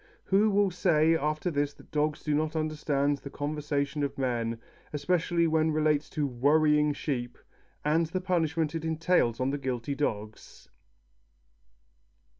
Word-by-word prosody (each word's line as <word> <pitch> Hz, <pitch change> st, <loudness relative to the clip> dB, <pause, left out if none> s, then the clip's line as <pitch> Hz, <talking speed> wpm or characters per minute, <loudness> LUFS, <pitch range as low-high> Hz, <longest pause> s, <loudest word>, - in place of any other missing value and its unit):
Who 205 Hz, +3 st, +3 dB
will 200 Hz, -1 st, +2 dB
say 165 Hz, -2 st, +3 dB
after 155 Hz, +3 st, -1 dB
this 145 Hz, -1 st, -1 dB
that -, -, -18 dB
dogs 150 Hz, 0 st, 0 dB
do 150 Hz, -, 0 dB
not 155 Hz, +2 st, 0 dB
understand 145 Hz, -2 st, 0 dB
the 140 Hz, -, -8 dB
conversation 145 Hz, 0 st, -2 dB
of 140 Hz, -1 st, -2 dB
men, 120 Hz, -3 st, -1 dB, 0.3 s
especially 170 Hz, +3 st, +1 dB
when 160 Hz, 0 st, +2 dB
it -, -, 0 dB
relates 155 Hz, -1 st, +1 dB
to 150 Hz, -, +2 dB
"worrying" 150 Hz, +3 st, +3 dB
sheep, 125 Hz, -4 st, -3 dB, 0.5 s
and 160 Hz, +2 st, +2 dB
the 185 Hz, +4 st, -2 dB
punishment 165 Hz, -4 st, 0 dB
it 165 Hz, -1 st, -3 dB
entails 160 Hz, -7 st, +1 dB
on 130 Hz, +1 st, 0 dB
the 145 Hz, -, -2 dB
guilty 130 Hz, 0 st, -3 dB
dogs? 110 Hz, -7 st, -5 dB
150 Hz, 145 wpm, -28 LUFS, 140-160 Hz, 0.5 s, Who